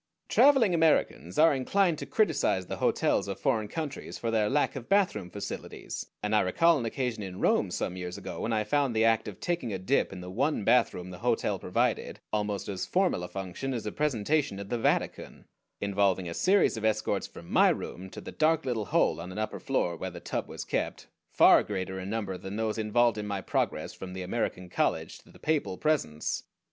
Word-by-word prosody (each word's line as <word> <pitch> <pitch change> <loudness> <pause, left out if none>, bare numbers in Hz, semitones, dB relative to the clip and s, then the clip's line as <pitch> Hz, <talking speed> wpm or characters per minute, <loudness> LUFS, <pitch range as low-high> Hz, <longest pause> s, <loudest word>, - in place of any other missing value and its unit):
Traveling 265 -9 +5
Americans 160 -3 +2
are 160 0 +6
inclined 170 +5 +1
to - - -6
criticize 95 - +1
the - - -5
hotels - - +1
of 100 - -4
foreign 115 -7 +1
countries 155 +3 -5
for 115 - -2
their 110 -2 +2
lack 145 +1 +1
of 125 -3 -7
bathroom 180 - +2
facilities, 100 +2 -6 0.2
and 105 +1 +1
I - - +6
recall 165 - +3
an 120 - -3
occasion 120 -2 -2
in 95 -2 -6
Rome - - +2
some 90 - -3
years 90 -1 -5
ago - - -7
when 115 - -1
I 110 -1 +1
found 135 +2 +1
the 110 +1 +4
act 115 -1 +3
of 100 -3 -7
taking 170 -10 -2
a 95 - -2
dip 95 +10 +1
in 95 - -7
the 90 0 -8
one 135 +3 0
bathroom 90 -6 +2
the 90 - -9
hotel 120 +1 0
provided - - -1
almost 105 -1 -1
as 95 -2 -3
formal 185 - +1
a 90 - -4
function 95 +9 -4
as 115 - -4
a 105 - -2
presentation 145 -3 0
at 100 0 -7
the 120 - -1
Vatican, - - -1 0.3
involving 100 -2 +1
a 85 - -4
series 190 - +3
of 110 - -5
escorts 110 -2 0
from 85 - -12
my - - +6
room 95 +2 -4
to - - -9
the - - -8
dark 160 0 +2
little 115 -5 -1
hole 85 - +2
on 90 +2 -7
an 95 - -8
upper 110 0 -3
floor 85 - 0
where 95 +3 -4
the 90 -1 -9
tub - - -3
was - - -6
kept, - - -2 0.2
far - - +6
greater 95 -2 -4
in 95 +1 -5
number 100 -4 -3
than 95 +1 -6
those 110 0 -1
involved 110 +1 +2
in 105 - -4
my 100 -1 -2
progress - - -1
from 90 -1 -8
the 95 0 -5
American 90 -2 -2
college 90 - -1
to - - -22
the - - -16
papal 150 -12 -1
presence. 135 - 0
110 Hz, 210 wpm, -29 LUFS, 95-140 Hz, 0.3 s, are